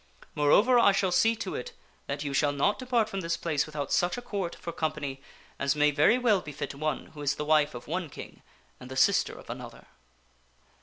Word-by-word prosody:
Moreover, 210 - +4
I 200 -4 +5
shall 195 -1 +1
see 225 +5 +3
to 225 - -5
it 480 - -6 0.3
that 140 +1 -3
you 140 -1 -3
shall 145 +1 +2
not 145 +9 +1
depart 245 -4 +1
from 195 -3 -4
this 165 -1 -1
place 155 -3 -1
without 150 -2 -5
such 175 +6 +1
a - - -4
Court 195 -7 -3
for 170 - -7
company 150 -4 -3 0.4
as 140 +1 +1
may 150 0 +3
very 150 - +4
well 225 -7 +2
befit 150 -3 -6
one 155 +2 -3
who 150 - -9
is 145 -1 0
the 150 - -4
wife 150 -2 +3
of 120 - -9
one 175 0 -3
king - - -10 0.4
and 125 - -11
the 130 - -7
sister - - +3
of - - -13
another." - - -9
155 Hz, 210 wpm, -28 LUFS, 145-200 Hz, 0.4 s, I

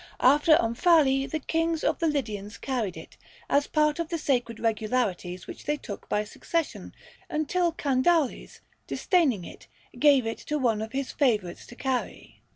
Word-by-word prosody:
After 295 +4 +6
Omphale 270 +2 +3
the 315 - -1
kings 325 +1 -1
of - - +1
the 330 - +1
Lydians 215 -9 -3
carried 235 -9 -3
it, - - -12 0.3
as 285 0 +2
part 300 0 +1
of 335 -1 -2
the 335 - -1
sacred 245 -7 -1
regalities 215 -5 -1
which - - -10
they 295 0 0
took 205 -7 -9
by 210 - +1
succession, 325 +9 -4 0.3
until 335 +3 0
Candaules, 290 0 0 0.3
disdaining 285 - +1
it, - - -12 0.3
gave 280 -5 +5
it 225 - -3
to 300 - -3
one 230 -6 +1
of 220 0 -5
his 270 0 -2
favorites 210 - 0
to 240 - -12
carry. 260 -1 -4
270 Hz, 160 wpm, -27 LUFS, 225-305 Hz, 0.3 s, After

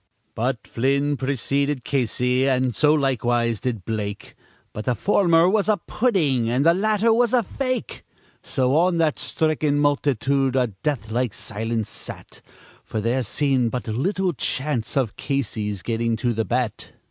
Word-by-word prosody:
But 115 -2 -2
Flynn 140 +4 +1
preceded 140 +1 -1
Casey, 125 +1 +1
and 130 -2 +1
so 150 -1 +4
likewise 120 -5 +1
did 115 -8 -3
Blake, 105 -2 -4 0.4
But 105 - -6
the 125 - +1
former 170 - +3
was 210 +2 +2
a 215 - +4
pudding, 160 - 0
and 130 +5 +1
the 165 - +6
latter 215 +4 +2
was 240 +1 +2
a 245 -2 +4
fake; 255 +4 -3 0.4
So 130 0 0
on 175 +2 +3
that 160 -3 +1
stricken 155 -2 0
multitude 140 -2 +1
a 125 -5 +1
death 130 -8 -2
like 120 -1 -1
silence 110 0 -3
sat, - - -9 0.4
For 110 - -4
there 120 +5 0
seemed 130 0 +1
but 125 0 -4
little 180 - 0
chance 135 -2 -2
of 125 -6 0
Casey's 110 -7 -2
getting 115 0 0
to 120 +2 -1
the 110 0 -1
bat. 120 -3 -2
130 Hz, 150 wpm, -23 LUFS, 115-150 Hz, 0.4 s, the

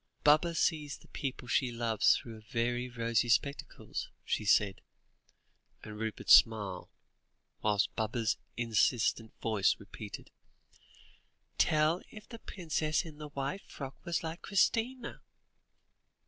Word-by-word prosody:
"Baba 155 +3 +4
sees 150 -4 0
the - - -20
people 130 -2 -5
she 125 0 +1
loves 115 -2 +3
through 110 -2 -9
very 120 +2 -1
rosy 115 -1 0
spectacles," 140 +4 -1 0.2
she 105 - -1
said, 100 -1 +3 1.0
and 105 - -8
Rupert 110 -1 -4
smiled, 100 -5 +5 0.7
whilst 105 -1 +1
Baba's 110 0 -1 0.2
insistent 115 -1 +1
voice 110 -4 +2
repeated - - -9 1.3
"Tell 155 +3 +3
if 210 -1 -12
the 230 - -10
princess 160 -5 -1
in 155 -2 -11
the 150 -1 -7
white 140 +7 -3
frock 135 -1 -7
was 170 -2 -1
like 165 +2 -5
Christina." 235 +5 0
125 Hz, 115 wpm, -32 LUFS, 110-160 Hz, 1.3 s, smiled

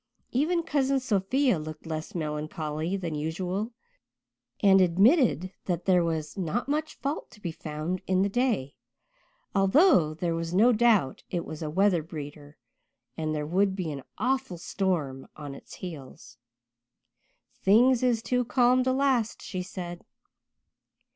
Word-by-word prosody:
Even 330 +7 +1
Cousin 275 -3 +1
Sophia 245 - +1
looked 155 +1 -8
less 155 +1 -5
melancholy 155 +2 -3
than 175 -4 -4
usual 180 +8 -3 0.9
and 195 -2 +6
admitted 195 - +3
that 175 -1 -2
there 180 -2 +4
was 160 -2 -2
not 195 +6 -2
much 305 +2 -2
fault 280 +3 -4
to - - -17
be 175 -5 -4
found 160 +3 -4
in 185 0 +3
the - - +2
day, 210 - 0 0.8
although 195 - +4
there 170 +1 -1
was 165 +1 -3
no 230 +6 +6
doubt 215 - +3
it 175 -2 -2
was 155 - -7
a 155 - -3
weather 185 +1 +3
breeder 145 -2 -9 0.6
and 155 -1 -2
there 150 -1 -2
would 190 +4 +1
be 180 -5 -3
an 140 -2 -6 0.2
awful 260 -7 -1
storm 165 -8 -2
on 145 -2 -7
its - - -12
heels. 135 -8 -10 1.2
"Things 235 +5 +5
is 240 -3 +1
too 250 0 +1
calm 250 +1 +3
to 260 - +1
last," 260 -4 +1
she 185 -3 -4
said. 175 -1 -7
185 Hz, 140 wpm, -27 LUFS, 155-240 Hz, 1.2 s, and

